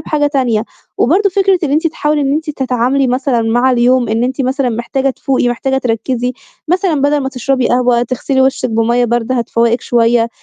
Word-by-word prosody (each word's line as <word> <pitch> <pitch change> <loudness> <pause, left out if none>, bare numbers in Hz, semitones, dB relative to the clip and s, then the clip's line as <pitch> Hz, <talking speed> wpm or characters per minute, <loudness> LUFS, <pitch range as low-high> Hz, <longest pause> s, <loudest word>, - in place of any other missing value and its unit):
بحاجة 300 -1 0
تانية، 245 -6 0 0.3
وبرضو 385 - +3
فكرة 385 0 +2
إن 280 - -2
أنتِ 315 +3 +1
تحاولي 300 -2 -1
إن 275 0 0
أنتِ 315 +1 -2
تتعاملي 260 0 0
مثلًا 250 -1 0
مع 240 +3 +2
اليوم 245 0 +2
إن 225 +2 0
أنتِ 265 +2 -3
مثلًا 265 0 0
محتاجة 265 +4 -1
تفوقي 260 -1 -1
محتاجة 265 +2 -1
تركّزي، 245 +1 -2 0.4
مثلًا 360 -4 +1
بَدَل 290 +1 +2
ما 265 - -2
تشربي 260 -1 -1
قهوة 245 -1 +2
تغسلي 265 +2 -1
وشِك 260 -2 +1
بمَيِّة 235 +2 +1
باردة 240 +2 -1
هتفوقِك 235 0 0
شوية، 235 -1 +1
255 Hz, 180 wpm, -14 LUFS, 240-280 Hz, 0.4 s, وبرضو